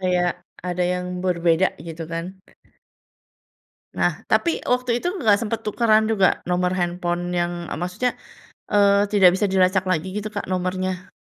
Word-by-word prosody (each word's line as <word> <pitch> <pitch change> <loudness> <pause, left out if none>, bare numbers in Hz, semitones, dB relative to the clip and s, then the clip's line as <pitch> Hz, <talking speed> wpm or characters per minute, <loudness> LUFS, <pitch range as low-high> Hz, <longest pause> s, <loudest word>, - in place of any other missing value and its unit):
kayak 180 -1 +1 0.4
ada 180 0 -1
yang 180 0 -3 0.2
berbeda, 170 0 +2 0.2
gitu, 165 0 -6
kan. 165 0 -3 1.7
Nah, - - +2 0.2
tapi 335 - +1
waktu 250 0 +1
itu 350 - -1
nggak 215 - +3
sempet 225 0 -2
tukeran 220 0 +3
juga 195 -4 +4 0.2
nomor 180 0 +1
handphone 175 0 -2
yang, 175 0 0 0.2
eee, - - -4
maksudnya, 185 +8 -1 0.6
eee, 200 0 +4
tidak 195 -4 +7
bisa 205 +2 +1
dilacak 185 0 +3
lagi, 165 +1 -1
gitu, 210 +1 -3
Kak, 205 - -5
nomornya? 185 0 -3
185 Hz, 145 wpm, -22 LUFS, 180-205 Hz, 1.7 s, tidak